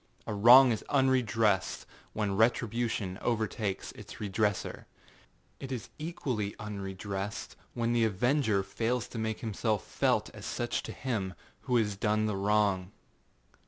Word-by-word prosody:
A - - -3
wrong 120 +5 +8
is 110 - -1
unredressed 115 -8 +2 0.3
when 105 -2 -1
retribution 115 -3 +1
overtakes 110 -3 -1
its - - -11
redresser. 105 -1 -1 0.7
It 135 - -7
is 120 -5 -5
equally 130 -10 -3
unredressed 100 -1 -5 0.2
when 120 0 0
the 115 -1 +3
avenger 110 0 +2
fails 115 +5 -1
to 115 - -6
make 110 0 -2
himself 110 -1 -1
felt - - +1
as - - -8
such - - -2
to - - -3
him 105 -8 -3 0.3
who 125 - +3
has 105 -4 +2
done 110 0 +1
the 105 -2 -1
wrong. 100 -2 +1
110 Hz, 130 wpm, -30 LUFS, 100-120 Hz, 0.7 s, wrong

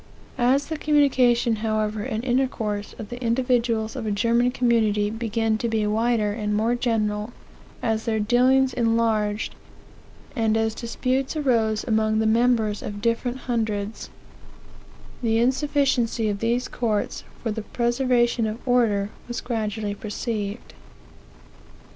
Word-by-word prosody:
"As 260 +4 +3
the 315 -1 -5
communication, 255 -6 +3
however, 215 -1 -1
and 220 +2 -3
intercourse, 235 -5 -1
of 215 - -8
the 245 +1 -7
individuals 235 -2 +1
of 240 -4 -4
a - - 0
German 235 +4 +2
community 220 -5 +1
began 225 -1 -1
to 235 - -1
be 220 -1 0
wider, 220 0 +1
and 210 -1 -2
more 225 +3 +2
general, 220 -3 -1 0.5
as 220 -1 0
their 220 -2 0
dealings 255 +4 +3
enlarged, 225 -2 +1 0.8
and 225 -3 +2
as 225 0 0
disputes 255 +5 -2
arose 230 -7 +1
among 220 -1 +1
the 220 - +1
members 225 -2 +2
of 205 0 -6
different 235 +3 -1
hundreds, 220 -3 -2 1.1
the 225 -2 +1
insufficiency 255 -3 +1
of 200 -1 -2
these 235 +3 0
courts 220 -4 -2 0.2
for 225 - -1
the 220 +1 -3
preservation 240 0 +1
of 220 +4 -6
order 215 -5 +2 0.2
was 240 -1 -4
gradually 220 -3 -3
perceived. 210 0 -4
230 Hz, 130 wpm, -24 LUFS, 215-245 Hz, 1.1 s, As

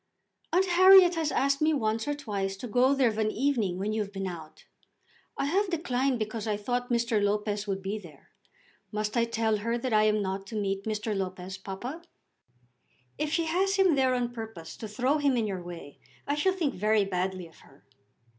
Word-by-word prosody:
"Aunt 365 +3 +3
Harriet 370 0 +7
has 320 -3 -1
asked 275 +1 +1
me 310 0 +3
once 225 -1 -1
or 290 - 0
twice 200 -8 -3
to 245 - -6
go 250 +4 +3
there 265 -3 +3
of 220 0 -4
an 215 -1 +2
evening, 225 -7 0
when 205 +3 -2
you 220 - 0
have 200 -1 -5
been 195 -1 -4
out. 165 -4 -8 0.7
I - - 0
have 380 +7 +1
declined 270 -6 0
because 220 0 -4
I 210 -1 0
thought 245 +4 -2
Mr. 235 -2 +1
Lopez 210 0 -1
would 195 -1 -3
be 200 +3 -3
there. 160 -8 -16 0.6
Must 210 +1 -2
I 235 -1 +3
tell 225 -2 0
her 230 +3 -1
that 240 0 -3
I 215 0 +5
am 215 0 +2
not 195 0 -3
to 220 0 -4
meet 195 -1 -2
Mr. 215 0 -2
Lopez, 190 0 -5
papa?" 240 - -6 1.2
"If 300 0 -1
she 330 +1 +1
has 380 +5 +1
him 380 -3 +4
there 260 -2 +2
on 240 -1 -2
purpose 220 -9 -8
to 220 - -6
throw 255 +8 0
him 280 -3 +2
in 225 - +1
your 190 -3 -3
way, 170 -5 -10 0.3
I 285 - 0
shall 335 +6 +2
think 325 -8 -1
very 210 +1 +2
badly 185 -1 -2
of 165 - -17
her." 135 - -21
220 Hz, 205 wpm, -28 LUFS, 200-275 Hz, 1.2 s, Harriet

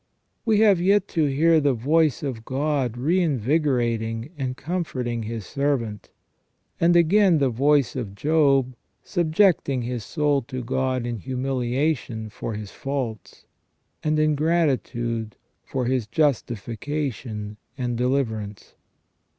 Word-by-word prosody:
We 220 -2 +3
have 200 -5 +5
yet 200 +2 +3
to 160 -2 +1
hear 160 +4 +4
the 140 -3 +2
voice 150 +4 +2
of 125 -6 -4
God 135 -2 -1
reinvigorating 130 - 0
and 130 -3 -3
comforting 130 -8 -3
His 110 -2 -5
servant; 120 -6 -2 0.7
and 170 +1 +4
again 175 +1 +5
the 135 -3 +2
voice 140 +2 +2
of 110 -7 -5
Job, 140 -2 +2 0.3
subjecting 165 -6 +2
his 120 -2 -4
soul 145 +2 +1
to 130 -2 -5
God 130 0 -1
in 120 -1 -3
humiliation 130 -1 -2
for 115 -1 -5
his 105 -1 -7
faults, 130 -6 -5 0.6
and 155 0 +1
in 155 0 +3
gratitude 130 -8 0 0.3
for 130 -2 -3
his 125 -3 0
justification 115 -3 -2 0.2
and 125 -2 -2
deliverance. 115 -5 -2
130 Hz, 120 wpm, -24 LUFS, 115-155 Hz, 0.7 s, have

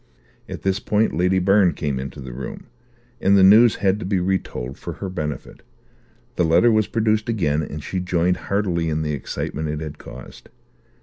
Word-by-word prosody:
At - - -7
this 95 0 0
point 105 -3 0
Lady 90 +3 +2
Byrne 95 0 +4
came 70 -4 -2
into 70 +2 -7
the 65 -2 -8
room, 65 +1 -7 0.5
and 100 +1 +4
the 95 - +6
news 110 +4 +7
had 100 +1 +1
to - - -5
be 95 -1 +1
retold 90 -8 -3
for - - -6
her 95 - -6
benefit; 75 -5 -5 0.8
the 90 - +3
letter 85 +9 +4
was 110 -1 +2
produced 110 -1 0
again, 80 -9 0
and 75 -1 -6
she 95 - -3
joined 90 0 0
heartily 90 -5 0
in 80 0 -1
the 75 -1 -2
excitement 75 +2 -4
it 75 0 -3
had 75 -2 -7
caused. 65 0 -12
90 Hz, 185 wpm, -22 LUFS, 75-100 Hz, 0.8 s, news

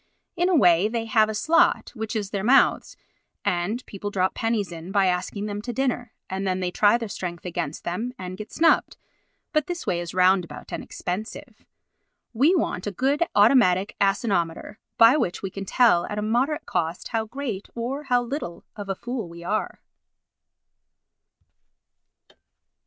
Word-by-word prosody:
In 355 +1 +1
a 365 - +3
way 180 - +5
they 225 0 -2
have 220 -1 +3
a 215 - -3
slot, 315 +10 +3
which 220 -1 -5
is 205 -3 -2
their 195 -1 -2
mouths, 260 +5 +3 0.5
and 195 +8 -1
people 205 0 -6
drop 190 -2 0
pennies 225 -5 -1
in 170 +2 -8
by 200 -1 +3
asking 185 +3 -1
them 205 -1 -4
to 240 +3 -5
dinner, 245 -1 -1 0.2
and 190 +1 -3
then 185 0 0
they 180 -1 -2
try 205 +4 +4
their 230 -2 -5
strength 180 -4 -6
against 160 -4 -4
them 220 +8 -3
and 185 0 -6
get 215 +3 -9
snubbed; 325 +1 +2 0.6
but 305 -2 +1
this 350 0 -4
way 175 - 0
is 175 0 -6
roundabout 185 -1 +1
and - - -4
expensive. 185 +5 -6 0.7
We 285 +11 +4
want 205 - -1
a - - -1
good 270 - 0
automatic 205 -3 +4
asinometer 195 -1 0 0.2
by 230 +5 +7
which 180 - -2
we 195 - -3
can 195 +1 -6
tell 225 -5 +3
at 210 - -5
a 210 - -1
moderate 260 +8 0
cost 165 +1 -2
how 225 -2 -1
great 230 -4 -5
or 260 +5 -4
how 245 -2 +2
little 240 - -5
of 205 -2 -7
a 195 - -1
fool 240 -4 -5
we 170 0 -10
are. 215 +5 -2
210 Hz, 170 wpm, -24 LUFS, 185-245 Hz, 0.7 s, by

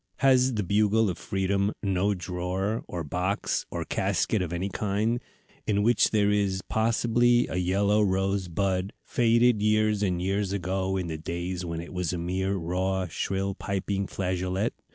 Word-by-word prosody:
Has 130 -1 +4
the 105 - 0
Bugle 105 +2 +2
of 85 - -8
Freedom 100 +1 0
no 100 +1 +1
drawer, 90 +4 -2
or 85 -2 -4
box, 90 +7 -1
or - - -4
casket 105 - 0
of 90 -3 -3
any 90 +2 -2
kind, 105 +4 -1 0.5
in 105 -1 +2
which 120 +1 +4
there 105 -2 +2
is, 100 -2 0
possibly, 120 +2 +3
a - - -3
yellow 100 +4 +2
rose 95 -1 +1
bud, 95 +2 -1
faded 115 -1 +3
years 110 0 +2
and 90 -4 0
years 95 +2 -1
ago, 95 0 -1
in 90 - -2
the 80 -2 -5
days 85 +2 -4
when 85 -1 -4
it 85 - -10
was 90 -1 -1
a - - -2
mere 95 +3 -1
raw, 95 +2 -1
shrill, 95 +4 -2
piping 100 0 -2
flageolet? 95 +2 -1
95 Hz, 160 wpm, -27 LUFS, 90-105 Hz, 0.5 s, Has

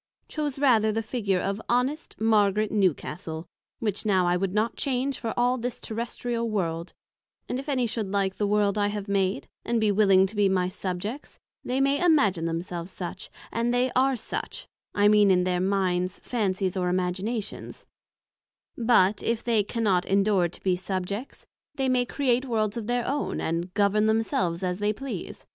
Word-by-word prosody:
chose 295 -3 -3
rather 230 -6 +4
the 225 +1 -1
figure 210 -5 -1
of 195 +3 -2
Honest 260 +6 -1
Margaret 215 -1 +3
Newcastle, 170 -4 -1 0.3
which 210 -3 -1
now 190 -4 +2
I 175 0 +2
would 190 +1 -1
not 215 +4 0
change 270 0 -1
for 225 - -3
all 245 +1 +2
this 245 +1 -4
Terrestrial 235 +1 -3
World; 170 -5 -2 0.5
and 250 - -2
if 275 +3 -7
any 255 -3 +1
should 220 -3 -2
like 195 -2 0
the 205 - 0
World 205 0 +2
I 205 - +2
have 205 0 -4
made, 195 0 0 0.2
and 235 0 0
be 215 -2 +3
willing 195 -2 +5
to 200 +3 -6
be 205 -1 +3
my 185 -1 +1
Subjects, 195 +7 -5 0.3
they 255 +2 -1
may 275 +3 +2
imagine 210 - +3
themselves 170 +1 -4
such, 185 0 -6 0.2
and 235 +1 0
they 245 +1 +1
are 265 +1 +3
such, - - -5 0.3
I 205 0 +4
mean 210 -1 +5
in 180 -1 +4
their 180 -1 0
Minds, 185 -1 0
Fancies 195 -5 -1
or 180 -1 0
Imaginations; 185 +5 -3 0.9
but 225 -4 +3
if 230 0 -1
they 225 -3 +2
cannot 205 -4 0
endure 195 -2 +3
to - - -14
be 185 -2 +2
Subjects, 190 +6 -4 0.3
they 270 -2 0
may 250 -1 +2
create 255 -2 +1
Worlds 220 -4 0
of 225 -3 -4
their 245 0 0
own, 285 +2 -1
and 170 +2 -2
Govern 210 +1 +3
themselves 195 -5 0
as 180 0 -1
they 210 +1 +1
please. 270 +4 -6
210 Hz, 175 wpm, -26 LUFS, 185-235 Hz, 0.9 s, willing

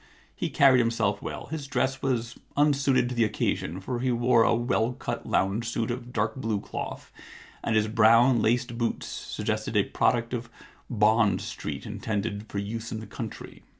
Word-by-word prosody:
He - - -2
carried 135 -2 +5
himself 115 -4 +1
well. - - -6
His 150 -3 -4
dress 130 0 0
was 120 -3 -1 0.2
unsuited 140 -4 +3
to - - -3
the 120 -1 +2
occasion, 95 -4 -1
for 120 +5 -4
he 130 +1 +1
wore 120 0 +3
a 115 - +4
well 120 0 0
cut - - -5
lounge 105 +5 0
suit 115 +1 -1
of 120 0 -6
dark - - -1
blue 110 -5 -1
cloth, - - -6 0.5
and 110 - 0
his 110 0 +3
brown, 115 +2 +5
laced 120 +1 0
boots 115 - -1
suggested - - -3
a - - +5
product 120 0 0
of 120 -1 -4 0.4
Bond 105 -3 +3
Street 75 -9 -6
intended 105 0 -3
for - - -5
use 110 +3 -4
in 110 - -3
the 110 - -8
country. 110 +2 -8
115 Hz, 175 wpm, -27 LUFS, 110-125 Hz, 0.5 s, carried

